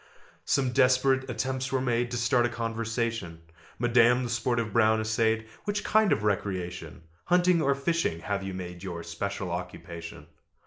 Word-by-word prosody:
Some 130 -2 +1
desperate 130 +1 +3
attempts 130 +2 -2
were 135 - +1
made 120 -1 0
To 120 - -3
start 120 0 +2
a - - -5
conversation; 115 -6 -3 0.3
"Madam," 120 +1 +4
the 120 - -3
sportive 115 -2 -1
Brown 110 -1 +4
essayed, 110 0 +1 0.2
"Which 205 0 -1
kind 215 -1 +3
of 105 - +1
recreation, 95 -5 -3 0.2
Hunting 180 -1 +3
or 140 -2 +2
fishing, 140 - -1
have 100 +2 -2
you 95 -1 -5
made 90 -1 -7
Your 85 -3 -5
special 95 +2 -4
occupation?" 85 -1 -7
115 Hz, 150 wpm, -28 LUFS, 95-130 Hz, 0.3 s, Madam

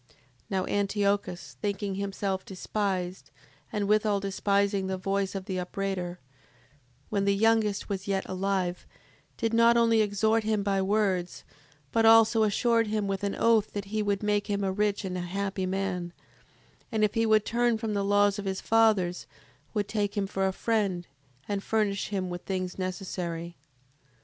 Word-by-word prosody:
7:24. 125 - -29 0.3
Now 190 -1 0
Antiochus, 200 -2 -1
thinking 200 -1 -2
himself 195 -1 -2
despised, 190 -1 -3 0.4
and 205 -1 -1
withal 210 -1 +3
despising 200 0 0
the 190 0 -2
voice 195 +1 -1
of 190 -1 -4
the 185 -1 -3
upbraider, 180 -1 -3 0.9
when 200 -2 0
the 200 0 +3
youngest 220 -1 +2
was 195 0 -4
yet 195 -1 0
alive, 185 -1 -2 0.5
did 225 0 -1
not 230 +1 +5
only 230 -1 +4
exhort 220 +2 +2
him 215 -1 0
by 195 -1 +1
words, 190 -3 0 0.5
but 225 - +2
also 225 0 +6
assured 230 +2 +2
him 210 -1 -1
with 195 0 -2
an 200 - -1
oath, 225 -2 +3
that 205 -1 -4
he 215 - +1
would 205 -1 -1
make 210 0 +1
him 200 0 0
a 190 - +1
rich 205 0 0
and 185 -1 -3
a - - -2
happy 190 +1 -2
man, 185 -2 -2 0.8
and, 220 -2 +1
if 210 -1 +2
he 225 0 +1
would 215 -1 +4
turn 235 0 +1
from 220 -1 -3
the 200 -1 0
laws 205 0 +3
of 205 - -5
his 190 -1 -2
fathers, 215 -6 +2 0.5
would 205 -1 0
take 210 -2 -2
him 200 - +1
for 195 0 -1
a - - +1
friend, 195 -4 -1 0.4
and 200 -1 -2
furnish 205 -2 0
him 195 -2 -2
with 175 0 -5
things 185 -1 -3
necessary. 175 -2 -4
200 Hz, 170 wpm, -28 LUFS, 190-215 Hz, 0.9 s, also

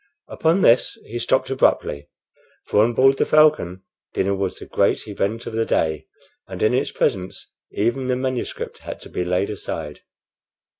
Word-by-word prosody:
Upon 165 +4 +1
this 120 +2 +4
he 120 +2 -5
stopped 130 +2 +1
abruptly; 75 - +1 0.6
for 105 - +3
on 120 +2 +1
board 135 +2 +5
the - - +2
Falcon 150 - +3 0.3
dinner 100 +1 +1
was 95 -1 -2
the - - -9
great - - 0
event 105 +2 -2
of - - -6
the 115 0 +1
day, 80 -8 -1 0.4
and - - -5
in 110 - +3
its 130 - +1
presence 95 -1 -2 0.2
even 120 +5 -1
the 125 - +1
manuscript 130 -1 -4
had - - -8
to - - -11
be 90 - -2
laid 90 +3 0
aside. 80 -7 -6
110 Hz, 165 wpm, -22 LUFS, 95-130 Hz, 0.6 s, board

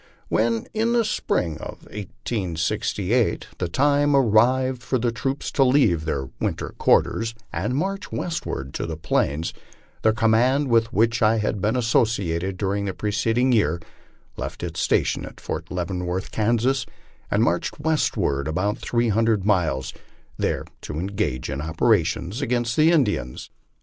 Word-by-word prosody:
When, 115 0 +1
in 225 +2 +1
the 235 -1 +3
spring 85 - -1
of - - -8
1868, 100 +2 -2
the 90 - 0
time 145 - +3
arrived 130 +1 +3
for 130 - 0
the 120 0 0
troops 135 +4 -3
to 135 - +3
leave 125 - +3
their 70 -4 -2
winter - - -2
quarters, 115 0 +2 0.2
and 105 +11 -1
march 195 +6 -2
westward 70 - -4
to - - -3
the 80 -1 -4
'Plains, 80 0 0 0.5
the 110 - +4
command 120 +5 +2
with 115 0 +3
which 115 +2 +2
I 110 +1 +4
had 105 -2 -1
been 105 +4 +1
associated 100 -7 +1
during 100 +1 -1
the 95 - -3
preceding 115 +4 +1
year 85 -8 +2 0.6
left - - -5
its - - -4
station - - +1
at - - -10
Fort - - -5
Leaven 90 0 -3
worth, 90 +1 -3
Kansas, 120 +4 +1 0.5
and 105 +2 +2
marched 90 +3 0
westward 145 - 0
about 100 +8 -1
three 120 -1 0
hundred 110 -2 +2
miles, 85 -10 +1 0.4
there - - -1 0.2
to 75 - -6
en 85 - -2
gage 65 -10 -1
in 70 +1 -3
operations 90 - +1
against 120 -3 0
the 155 +1 +5
Indians. 105 - 0
110 Hz, 150 wpm, -23 LUFS, 90-125 Hz, 0.6 s, the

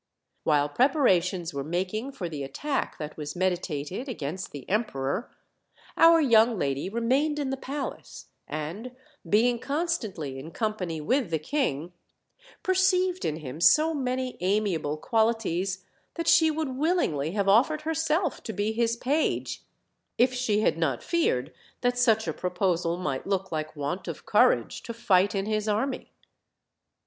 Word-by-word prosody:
While 145 -1 +3
preparations 185 - +2
were 140 0 -3
making 190 - -3
for 180 -9 -4
the 150 -4 -6
attack 275 - -3
that 150 -1 -7
was 150 +1 -5
meditated 180 - -2
against 180 - -5
the 140 -3 -9
emperor, 195 - -1 0.7
our 330 0 +7
young 230 -5 +4
lady 140 +1 -1
re 230 +4 -3
mained 290 +5 +2
in 280 -3 -2
the - - 0
palace; 275 +1 -6 0.2
and, 170 +12 -5 0.3
being 235 +3 +3
constantly 225 - -2
in 150 +4 -8
company 195 -7 -2
with 250 - +1
the 160 - +1
king, 170 - -2 0.7
perceived 370 -1 +2
in 150 - 0
him 150 -1 -7
so 310 - +5
many 255 -2 -2
amiable 180 -6 0
qnal* 225 +7 +2
ities 190 -2 -3 0.3
that 335 -1 -3
she 320 -2 +6
would 310 -2 -2
willingly 255 - 0
have 200 -1 0
offered 260 +10 +4
herself 320 +2 0
to 220 - -6
\>9 210 +2 0
his 230 0 +1
page, 285 +6 -1 0.6
if 250 +2 +4
she 230 -4 +1
had 165 - +1
not 140 -7 0
feared 320 - 0 0.3
that 245 0 +1
such 225 -3 +3
a - - -1
proposal 180 -2 0
might 145 -5 -3
look 195 -1 -1
like 155 -1 -3
Avant 145 +5 -4
of - - -6
courage - - +3
to 235 - -7
fight 195 -3 +3
in 195 0 -1
his 215 0 -1
army. 225 +6 -1
215 Hz, 150 wpm, -27 LUFS, 165-265 Hz, 0.7 s, our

